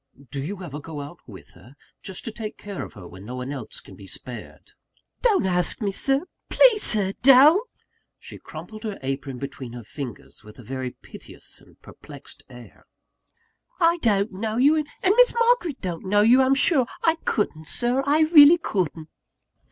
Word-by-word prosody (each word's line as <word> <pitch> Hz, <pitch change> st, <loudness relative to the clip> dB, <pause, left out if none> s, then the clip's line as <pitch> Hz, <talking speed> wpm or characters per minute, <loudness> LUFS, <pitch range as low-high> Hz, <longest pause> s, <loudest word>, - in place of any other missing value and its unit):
"Do 140 Hz, -, -4 dB
you 185 Hz, +6 st, -6 dB
ever 150 Hz, -4 st, -7 dB
go 155 Hz, 0 st, -8 dB
out 145 Hz, +4 st, -9 dB
with 100 Hz, -6 st, -13 dB
her? 130 Hz, +4 st, -18 dB, 0.3 s
just 190 Hz, -2 st, -8 dB
to 225 Hz, -, -4 dB
take 215 Hz, -1 st, -7 dB
care 200 Hz, -2 st, -7 dB
of -, -, -10 dB
her 100 Hz, -6 st, -12 dB
when 95 Hz, +2 st, -13 dB
no 125 Hz, +5 st, -8 dB
one 125 Hz, +2 st, -5 dB
else -, -, -8 dB
can -, -, -15 dB
be -, -, -14 dB
spared?" -, -, -11 dB, 0.5 s
"Don't 420 Hz, -, +2 dB
ask 180 Hz, -1 st, +1 dB
me 205 Hz, -4 st, -2 dB, 0.6 s
please, 475 Hz, -4 st, +5 dB
Sir, 195 Hz, -3 st, +4 dB
don't!" 295 Hz, -, +6 dB, 0.5 s
She -, -, -11 dB
crumpled 215 Hz, -1 st, -10 dB
her 210 Hz, -3 st, -5 dB
apron 135 Hz, 0 st, -4 dB
between 135 Hz, -2 st, -8 dB
her 120 Hz, -1 st, -9 dB
fingers, 125 Hz, -2 st, -9 dB
with 105 Hz, 0 st, -15 dB
a 125 Hz, -, -13 dB
very 130 Hz, +2 st, -5 dB
piteous -, -, -13 dB
and -, -, -23 dB
perplexed -, -, -14 dB
air. 120 Hz, -1 st, -15 dB, 0.9 s
"I 340 Hz, 0 st, +3 dB
don't 210 Hz, -, 0 dB
know 215 Hz, +3 st, -4 dB
you; 285 Hz, +5 st, +4 dB
and 305 Hz, -2 st, -2 dB, 0.2 s
Miss 475 Hz, +7 st, +4 dB
Margaret 465 Hz, -, +1 dB
don't 175 Hz, -4 st, -5 dB
know 205 Hz, +2 st, +2 dB
you, 240 Hz, +5 st, +5 dB
I'm 265 Hz, +1 st, +3 dB
sure 270 Hz, -3 st, +2 dB, 0.2 s
I 325 Hz, 0 st, +2 dB
couldn't, 160 Hz, -7 st, -2 dB
Sir, 245 Hz, -, -1 dB
I 290 Hz, +3 st, +2 dB
really 310 Hz, 0 st, +7 dB
couldn't!" 170 Hz, -, -3 dB
205 Hz, 175 wpm, -23 LUFS, -, 0.9 s, really